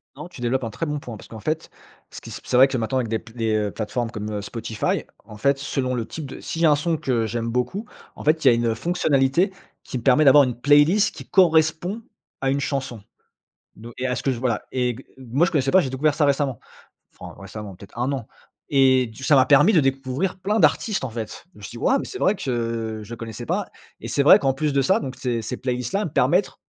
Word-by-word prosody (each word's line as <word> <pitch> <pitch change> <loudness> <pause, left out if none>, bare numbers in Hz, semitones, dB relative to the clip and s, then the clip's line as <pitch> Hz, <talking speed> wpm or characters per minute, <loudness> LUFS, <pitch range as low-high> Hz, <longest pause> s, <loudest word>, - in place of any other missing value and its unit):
Non, - - -8
tu 180 - -13
développes 125 +2 0
un 115 - -3
très 140 +10 -4
bon 150 -1 -3
point 120 -5 -8
parce - - -14
qu'en 110 - -10
fait, 155 +9 -3 0.4
ce - - -10
qui - - -11
se - - -7
p - - -19
c'est - - -1
vrai 130 +2 +8
que 135 -1 -2
maintenant 115 +3 -1
avec 120 - -2
des 110 0 -1
p 110 +1 -14
les, 115 -2 0
heu, 105 -1 0
plateformes 115 +2 -3
comme, 105 -2 -5
heu, 105 -1 -3
Spotify, 110 0 -2 0.2
en 105 - -12
fait, 140 +5 +2
selon 135 -2 -2
le 115 -2 -2
type 155 +3 -7
de - - -9
s'il 165 - -5
y - - +5
a - - +5
un - - +5
son 160 +3 -1
que 125 -7 0
j'aime 115 +1 -3
beaucoup, 125 - -2 0.3
en - - -9
fait, 155 0 +1
il - - +7
y - - +6
a - - +4
une 115 -1 0
fonctionnalité 155 - +1 0.3
qui - - -5
me 120 - -7
permet 135 +4 +5
d'avoir 145 0 +7
une 125 -3 -2
playlist 145 +9 +4
qui - - -9
correspond 175 +3 +2 0.4
à 135 0 +1
une 140 - 0
chanson. 135 -5 -3 0.7
Don 115 +2 -11
et 125 - -3
à 125 -1 0
ce - - -4
que 135 - 0
je 120 - -4
voilà, 120 -4 -1
et 125 -1 0
gue 130 +4 -13
moi, 130 +5 +1
je - - -4
connaissais 135 -3 +1
pas. 190 - +6
J'ai 135 - -3
découvert 140 +3 +1
ça 155 - +2
récemment, 140 -4 0 0.6
enfin, - - -9
récemment, 100 0 -8
peut-être 100 +4 -15
1 125 +3 0
an. 130 -5 -4 0.4
Et, 130 -2 +4
du 110 +3 -12
c - - -3
ça 150 - +6
m'a 130 -1 +5
permis 150 +10 +6
de 170 - +6
découvrir 135 +7 -1
plein 210 +4 0
d'artistes, 215 -5 +2
en - - -4
fait. 110 +4 -7
Je - - -20
me - - -15
suis - - -7
dit: 120 - -9
«Waouh 270 - +2
mais - - -5
c'est 385 - -7
vrai 195 - +2
que, 115 - -3
je 115 +3 -8
connaissais 115 -2 -7
pas.» - - -1 0.4
Et 115 - -6
c'est 140 +5 +1
vrai, 145 - +8
qu'en 135 -1 +1
plus 145 +2 -1
de 140 - +3
ça, 135 - +2
donc, 130 -1 -6
ces 125 -3 -2
ces 120 +3 -5
playlists 125 -1 -3
là 200 - +1
elle - - -1
mepermettrent 150 - +1
130 Hz, 265 wpm, -23 LUFS, 115-150 Hz, 0.7 s, vrai